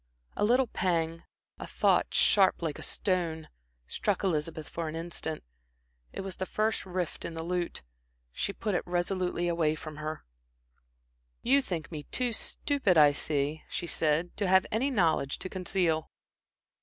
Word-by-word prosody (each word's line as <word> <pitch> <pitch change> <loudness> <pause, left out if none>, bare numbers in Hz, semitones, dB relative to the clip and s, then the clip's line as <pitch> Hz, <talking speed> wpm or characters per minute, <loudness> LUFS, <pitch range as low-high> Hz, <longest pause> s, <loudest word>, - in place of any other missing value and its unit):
A - - 0
little 250 +5 +4
pang, 165 -6 -1 0.3
a - - -6
thought - - +2
sharp 190 -3 +4
like 155 -3 -2
a - - -7
stone, 170 -5 -1 0.4
struck - - -1
Elizabeth 155 -3 -1
for 165 -1 -4
an 155 - -4
instant. 165 -1 -4 0.7
It - - -5
was 190 -1 -6
the 185 - -3
first 215 -2 0
rift 180 -2 -3
in 165 - -5
the 160 - -4
lute. 175 - -2 0.5
She 200 - -2
put 210 +1 -3
it 175 - +2
resolutely 175 0 0
away 165 -3 +2
from 155 -1 -8
her. 155 +1 -5 1.2
"You 275 +3 +5
think 175 - -4
me 150 -3 -6
too 245 -2 0
stupid, 260 - +1
I 145 -2 +7
see," 145 +1 -1
she - - -3
said 165 +1 +1
"to 200 - 0
have 190 0 +5
any 240 +6 +1
knowledge 165 - +2
to 185 - -6
conceal." 180 -4 0
175 Hz, 155 wpm, -30 LUFS, 160-190 Hz, 1.2 s, I